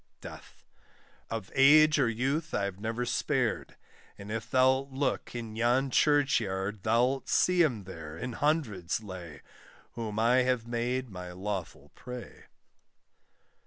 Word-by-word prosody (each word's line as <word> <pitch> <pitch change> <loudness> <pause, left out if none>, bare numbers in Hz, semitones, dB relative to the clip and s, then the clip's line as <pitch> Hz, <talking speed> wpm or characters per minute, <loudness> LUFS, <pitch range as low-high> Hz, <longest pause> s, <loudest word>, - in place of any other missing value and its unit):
DEATH. - - -12 0.7
Of 110 -4 -5
age 150 +2 +6
or 125 -4 +3
youth 135 +8 -1
I've 100 -2 -2
never 115 +3 -2
spared; - - -1 0.4
And 100 +1 -9
if 115 0 -3
thou'lt 130 +2 +3
look 135 -2 -2
in 115 -2 -6
yon 125 +4 +1
church 145 -2 +3
yard, 100 -1 -3
Thou'lt 120 +6 +1
see 180 -1 +3
them 125 -11 +1
there, 80 -4 -9
in 125 +8 -5
hundreds 115 - -1
lay, 90 -8 -9 0.5
Whom 110 -3 -5
I 115 +3 +4
have 125 -2 +1
made 120 +1 -2
my 90 -1 -7
lawful 95 -1 -5
prey. 125 -1 -10
120 Hz, 130 wpm, -29 LUFS, 100-130 Hz, 0.7 s, age